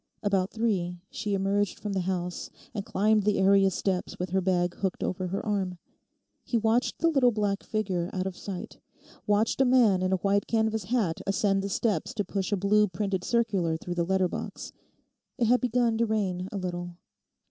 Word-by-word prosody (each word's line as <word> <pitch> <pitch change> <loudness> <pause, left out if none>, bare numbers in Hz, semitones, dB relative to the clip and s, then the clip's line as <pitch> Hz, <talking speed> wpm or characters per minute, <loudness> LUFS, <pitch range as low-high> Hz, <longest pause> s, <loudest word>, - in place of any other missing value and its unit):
About 195 -2 +1
three 190 -6 -1
she 205 -1 -2
emerged 195 +1 0
from 205 -2 -4
the 190 - 0
house 180 -1 -3 0.2
and 205 -4 -3
climbed 215 +2 +2
the 205 0 +1
area 195 0 +5
steps 185 0 -2
with 180 0 -4
her 190 0 +2
bag 175 -1 +1
hooked 190 -2 -2
over 185 0 -2
her 195 +3 -3
arm. 195 -4 -1 0.7
He 240 - 0
watched 225 +3 +1
the 335 - +2
little 270 -6 +4
black 205 -2 -1
figure 190 -5 -2
out 185 -1 -2
of 190 -2 -4
sight, 190 -2 -7 0.5
watched 210 +5 +2
a - - +7
man 240 -7 +4
in 185 0 0
a - - +4
white 200 0 +2
canvas 220 -2 0
hat 205 -7 0
ascend 195 0 +2
the 200 - -3
steps 225 +4 -1
to 205 -3 -1
push 195 0 -3
a 205 - +2
blue 210 +2 +3
printed 190 0 -2
circular 195 -9 +1
through 175 +2 -5
the 175 -1 0
letter 190 +1 +2
box. - - -6 0.7
It 240 - +2
had 250 +2 +4
begun 240 -2 +1
to 230 - +2
rain 190 -4 -1
a 205 - -4
little. 175 -2 -4
195 Hz, 190 wpm, -28 LUFS, 185-215 Hz, 0.7 s, a